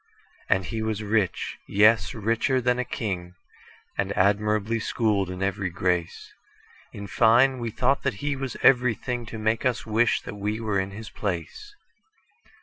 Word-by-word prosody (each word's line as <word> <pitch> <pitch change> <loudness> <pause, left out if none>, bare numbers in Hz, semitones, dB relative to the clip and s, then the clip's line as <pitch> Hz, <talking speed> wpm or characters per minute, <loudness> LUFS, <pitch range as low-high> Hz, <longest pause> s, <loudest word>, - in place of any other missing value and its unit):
And 95 -1 +2
he 110 +2 -4
was 110 -1 -2
rich,—yes, 105 0 +1
richer 115 +5 +1
than 125 0 +1
a - - +1
king,—And 95 -1 -6
admirably 105 +3 +2
schooled 105 -4 0
in 90 +1 -4
every 100 -1 -1
grace:In 90 +3 -5
fine, 120 +5 +4
we 120 -1 -3
thought 130 +5 +1
that 140 -6 -1
he 145 +7 -2
was 135 -2 -5
everythingTo 120 -2 +2
make 110 +1 0
us 125 -3 0
wish 110 +1 +2
that - - -7
we 105 +2 -2
were 105 -3 0
in 95 0 -2
his 105 +2 -9
place. 100 - -5
110 Hz, 140 wpm, -25 LUFS, 100-120 Hz, -, fine